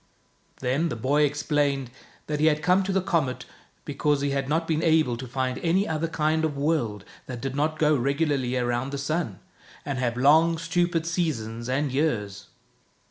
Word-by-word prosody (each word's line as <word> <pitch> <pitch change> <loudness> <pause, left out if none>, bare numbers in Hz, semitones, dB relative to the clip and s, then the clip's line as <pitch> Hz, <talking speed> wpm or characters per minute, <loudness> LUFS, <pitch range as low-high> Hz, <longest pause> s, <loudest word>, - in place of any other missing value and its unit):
Then 135 +6 0
the - - -3
boy 135 +6 +1
explained 145 -3 0 0.3
that 150 -1 -3
he 155 - +4
had 150 0 +2
come 180 +2 +4
to 195 - -1
the 190 -1 +1
comet 155 -9 -1 0.4
because 145 -2 0
he 140 0 0
had 135 -1 -2
not 165 +2 0
been 160 -1 0
able 155 -7 +3
to 125 +2 -7
find 130 +1 -2
any 180 +4 +1
other 160 +1 -1
kind 160 0 0
of 150 -3 -1
world 140 -9 -1 0.2
that 125 -2 -6
did 135 +1 -4
not 155 +2 0
go 150 0 +3
regularly 140 -1 0
around 120 +1 -1
the 140 - -3
sun, 140 - -2 0.5
and 140 -3 -3
have 120 -1 -1
long, 160 +5 +5
stupid 165 0 0
seasons 125 -9 -2
and 135 +2 0
years. 105 -9 -1
145 Hz, 180 wpm, -26 LUFS, 130-160 Hz, 0.5 s, long